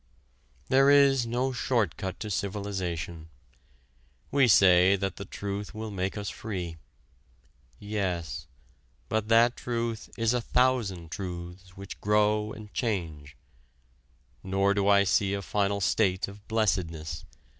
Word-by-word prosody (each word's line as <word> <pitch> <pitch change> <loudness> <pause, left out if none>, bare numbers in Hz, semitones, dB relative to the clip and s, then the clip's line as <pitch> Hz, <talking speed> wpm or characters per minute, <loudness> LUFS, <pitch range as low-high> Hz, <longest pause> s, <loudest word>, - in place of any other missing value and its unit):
There 135 +1 +5
is 140 -3 +5
no 125 +3 0
short 115 - 0
cut 95 -1 -5
to 105 - -4
civilization. 90 -5 -3 1.0
We 140 -2 +4
say 95 -2 +6
that 95 -1 -3
the 100 - -6
truth 100 +2 -5
will 110 0 -5
make 95 +1 -3
us 100 0 -4
free. 90 -7 -5 1.0
Yes, 95 -4 -3 0.6
but 110 -1 0
that 115 +2 +5
truth 115 -2 -3
is 115 +1 +2
a 125 - 0
thousand 115 -10 0
truths 90 0 -7
which 100 0 -9
grow 105 +1 +2
and 105 -1 -10
change. 80 - -3 1.0
Nor 95 +1 +1
do 100 -1 0
I 100 -1 +6
see 100 +1 +2
a 100 - -3
final 100 0 0
state 95 -1 +1
of 100 +1 -13
blessedness. 90 -8 -1
100 Hz, 125 wpm, -28 LUFS, 95-110 Hz, 1.0 s, say